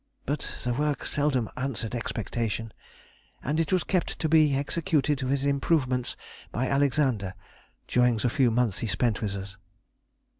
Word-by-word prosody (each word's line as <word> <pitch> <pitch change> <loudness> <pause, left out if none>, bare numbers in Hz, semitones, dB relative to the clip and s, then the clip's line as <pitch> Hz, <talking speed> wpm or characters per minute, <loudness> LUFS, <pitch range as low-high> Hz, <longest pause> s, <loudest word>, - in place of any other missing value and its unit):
But 145 +2 -2
the 120 - 0
work 145 +2 -1
seldom 140 -6 +1
answered 125 -4 -2
expectation, 115 -1 -3 0.7
and 150 +4 0
it 165 - 0
was 185 -3 +3
kept 185 -3 0
to 160 - 0
be 155 -3 +5
executed 150 0 +1
with 135 +1 0
improvements 135 -3 +1 0.3
by 125 - -1
Alexander 130 -8 +1 0.5
during 125 -2 +3
the 110 - +1
few 130 -2 +3
months 115 -3 +1
he 115 - -2
spent 115 0 +1
with 100 -2 -2
us. 100 -1 -7
130 Hz, 145 wpm, -27 LUFS, 115-145 Hz, 0.7 s, be